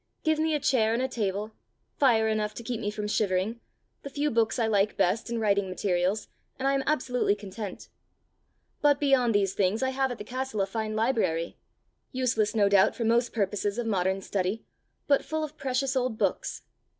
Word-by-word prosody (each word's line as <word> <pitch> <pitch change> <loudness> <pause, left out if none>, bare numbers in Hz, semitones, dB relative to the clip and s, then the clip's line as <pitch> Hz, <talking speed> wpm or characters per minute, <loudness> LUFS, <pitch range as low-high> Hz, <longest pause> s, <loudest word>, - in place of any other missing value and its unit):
Give 315 -1 +2
me 315 0 +1
a - - 0
chair 225 -5 +2
and 235 - 0
a - - +1
table, 210 -2 -2 0.5
fire 230 -5 +4
enough 215 -1 -1
to 235 - -7
keep 230 0 -4
me 205 - -1
from 210 0 -4
shivering, 210 +1 0 0.4
the 280 - -7
few 290 +2 -1
books 225 +1 +1
I 235 - +2
like 210 -1 +1
best 200 +4 +1
and 235 -1 -2
writing 200 -3 +1
materials, 185 +2 0 0.3
and 270 - -1
I 275 - +3
am 275 - +1
absolutely 250 -7 +1
content. 205 0 -7 0.9
But 290 -1 +4
beyond 260 -6 +3
these 195 -2 +2
things 205 +5 +1
I 260 - +2
have 265 0 0
at 245 - -5
the - - -7
castle 255 -2 -3
a - - +2
fine 215 +2 -3
library 220 -8 0 0.6
useless 235 -5 0
no 205 -2 +4
doubt 200 -1 +4
for 235 - -3
most 235 +2 +2
purposes 205 0 -1
of 240 - -2
modern 190 -2 0
study, 195 +3 -2 0.4
but 280 -1 +3
full 315 0 -2
of 305 -1 -6
precious 265 0 -1
old 250 -3 0
books. - - -1
220 Hz, 195 wpm, -28 LUFS, 200-260 Hz, 0.9 s, fire